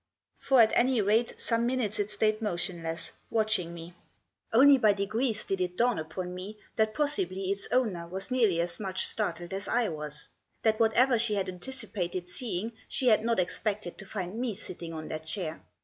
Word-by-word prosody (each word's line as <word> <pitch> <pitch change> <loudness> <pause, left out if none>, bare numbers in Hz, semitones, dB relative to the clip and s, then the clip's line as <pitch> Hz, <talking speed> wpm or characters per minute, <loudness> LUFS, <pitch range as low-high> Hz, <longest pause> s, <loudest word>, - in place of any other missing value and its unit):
For 270 -2 +3
at 220 - +2
any 250 0 +3
rate 215 +3 +1
some 230 +1 +1
minutes 240 -5 -1
it 205 0 0
stayed 215 +1 +1
motionless, 170 -4 -3 0.2
watching 215 -6 +1
me. 170 0 -9 0.6
Only 275 +4 +7
by 215 -3 +5
degrees 220 +3 -1
did 195 -1 -1
it 180 0 -2
dawn 240 -3 +2
upon 180 +3 -5
me 190 +4 -7 0.2
that 220 -1 +1
possibly 195 - 0
its 200 0 -3
owner 205 -10 +1
was 190 +7 -4
nearly 225 -9 +3
as 175 0 -2
much 190 -3 -1
startled 175 -4 -2
as 195 +1 -2
I 240 -2 +1
was; 150 -1 -5 0.4
that 220 0 +2
whatever 235 +2 +4
she 220 -2 +3
had 195 -2 -1
anticipated 185 -3 -4
seeing 210 +1 -3 0.2
she 255 - +3
had 215 -1 +4
not 230 0 +1
expected 200 +1 -1
to 195 - -8
find 190 +2 -4
me 240 -4 -1
sitting 175 -4 -6
on 155 -1 -6
that 155 0 -6
chair. 160 -1 -2
205 Hz, 180 wpm, -29 LUFS, 180-230 Hz, 0.6 s, Only